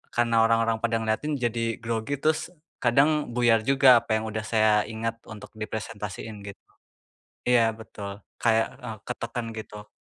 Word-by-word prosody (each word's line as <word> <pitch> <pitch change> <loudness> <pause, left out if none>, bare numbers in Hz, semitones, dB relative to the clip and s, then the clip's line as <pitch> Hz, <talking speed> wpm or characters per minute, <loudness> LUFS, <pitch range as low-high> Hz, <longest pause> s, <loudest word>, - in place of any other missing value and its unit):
karena 115 -1 +3
orang-orang 115 0 +2
pada 115 0 0
ngeliatin, 125 +8 -1
jadi 115 -2 -1
grogi 115 +4 -2
terus 160 +3 0 0.2
kadang 135 +1 +2
buyar 120 -1 +3
juga 135 -3 +7
apa 110 - -1
yang 110 0 -1
udah 110 0 -3
saya 110 -1 +3 0.2
ingat 115 +1 -4
untuk 110 -2 -10
dipresentasiin 105 -1 -6
gitu. 100 - -10 0.8
Iya 120 -2 +4
betul, 100 -2 -8 0.2
kayak, 115 -1 +3 0.2
eee, 115 -3 -6
ketekan 120 -1 -4
gitu. 105 -1 -9
115 Hz, 145 wpm, -26 LUFS, 110-120 Hz, 0.8 s, juga